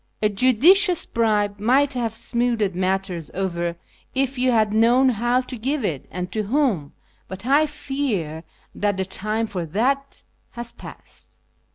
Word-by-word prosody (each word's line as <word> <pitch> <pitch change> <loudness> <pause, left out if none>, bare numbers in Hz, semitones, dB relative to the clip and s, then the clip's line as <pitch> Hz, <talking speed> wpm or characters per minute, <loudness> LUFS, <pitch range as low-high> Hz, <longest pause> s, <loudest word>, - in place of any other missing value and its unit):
A 210 - +4
judicious 315 - +4
bribe 210 -3 0
might 265 +6 +3
have 230 -3 -2
smoothed 235 -4 0
matters 185 -2 -2
over 175 -3 -2 0.4
if 270 0 0
you 255 0 +2
had 215 -3 +2
known 240 +4 +4
how 240 +2 +1
to 255 0 -8
give 260 +2 -2
it 150 -8 -3
and 180 +1 -5
to 215 - 0
whom, 210 - 0 0.3
but 190 +3 -9
I 290 +4 +4
fear 265 - -3 0.3
that 205 -1 -1
the 190 - -1
time 215 +4 -2
for 190 -5 -4
that 260 - -1 0.3
has 235 -1 -6
passed." - - -13
225 Hz, 150 wpm, -22 LUFS, 195-260 Hz, 0.4 s, A